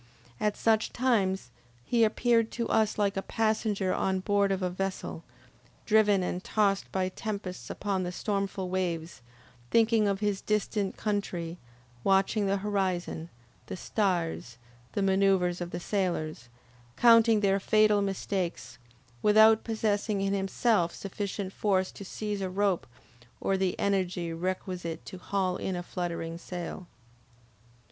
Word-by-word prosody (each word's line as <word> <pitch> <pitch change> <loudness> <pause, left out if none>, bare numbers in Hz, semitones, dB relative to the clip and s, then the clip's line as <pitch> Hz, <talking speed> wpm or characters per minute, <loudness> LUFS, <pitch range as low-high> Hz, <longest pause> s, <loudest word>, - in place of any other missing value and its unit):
At 210 -1 0
such 220 -1 +2
times, 195 - +1 0.3
he 235 -2 +3
appeared 230 +1 +3
to 235 -1 -2
us 220 -1 +2
like 200 -1 +1
a 195 - -1
passenger 215 -3 0
on 190 0 0
board 200 +1 +2
of 190 -1 -1
a 180 - +1
vessel, 185 -3 -4 0.6
driven 210 -3 +4
and 180 +1 -3
tossed 200 -2 +1
by 185 -1 0
tempests 200 -2 -5
upon 200 -2 -2
the 180 -1 -3
stormful 195 -1 -2
waves, 170 -4 -3 0.5
thinking 225 -2 +4
of 200 -1 0
his 205 -2 -1
distant 210 -1 -1
country, 180 -5 -2 0.4
watching 195 +2 +2
the 195 +1 +2
horizon, 185 -5 -1 0.4
the - - -5
stars, 175 - -1 0.4
the 200 - 0
manoeuvres 190 -2 +2
of 175 - -3
the 175 - -4
sailors, 170 - -2 0.5
counting 230 -2 +6
their 195 -1 +3
fatal 215 +1 +4
mistakes, 190 - -3 0.4
without 220 +1 +6
possessing 215 -2 0
in 195 0 0
himself 195 -1 +1
sufficient 195 0 -4
force 190 -3 +1
to - - -10
seize 205 +1 -4
a 190 - -2
rope, 195 -1 0 0.5
or 195 - +1
the 190 -1 0
energy 185 -4 0
requisite 180 -1 -4
to 185 - -8
haul 185 -1 -1
in 190 - -3
a 175 - -4
fluttering 170 -2 -4
sail. 175 0 -6
195 Hz, 135 wpm, -29 LUFS, 180-210 Hz, 0.6 s, counting